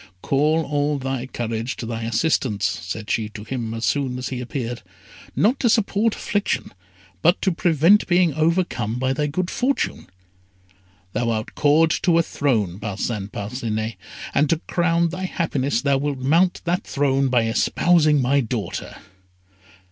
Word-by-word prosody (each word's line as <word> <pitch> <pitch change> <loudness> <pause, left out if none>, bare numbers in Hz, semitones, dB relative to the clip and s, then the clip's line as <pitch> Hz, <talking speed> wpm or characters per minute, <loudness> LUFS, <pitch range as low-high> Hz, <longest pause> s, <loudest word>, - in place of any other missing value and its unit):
"Call 155 +4 +2
all 145 0 0
thy 135 -1 -3
courage 115 0 -3
to - - -6
thy 115 0 -4
assistance," 115 -4 0
said 90 +4 -3
she 110 -2 0
to 105 -1 -9
him 115 -1 -4
as 115 - -2
soon 135 -3 0
as 125 - -4
he 125 -1 -4
appeared 120 -1 -4 0.5
"not 240 +6 +2
to 240 - +2
support 220 0 +2
affliction, 205 -1 -2 0.5
but 175 - +4
to 190 - +3
prevent 170 +4 +3
being 175 -3 +3
overcome 155 - 0
by 130 +1 0
thy 150 +2 -1
good 175 +5 -2
fortune. 265 +3 -1 1.1
Thou 120 -1 0
art 110 -1 -2
called 160 +2 +3
to 170 -3 +3
a 170 - +4
throne, 110 - -1
Parcin 105 0 -3
Parcinet, 110 0 -3 0.4
and 145 0 +2
to 165 - +3
crown 170 -1 +1
thy 185 +2 -4
happiness, 140 -8 -1
thou 140 -1 +2
wilt 145 -1 -2
mount 165 +8 +2
that 175 +1 -1
throne 135 -1 +1
by 125 -2 +2
espousing 150 +6 +3
my 135 +2 +2
daughter." 115 -2 -4
135 Hz, 155 wpm, -22 LUFS, 115-165 Hz, 1.1 s, but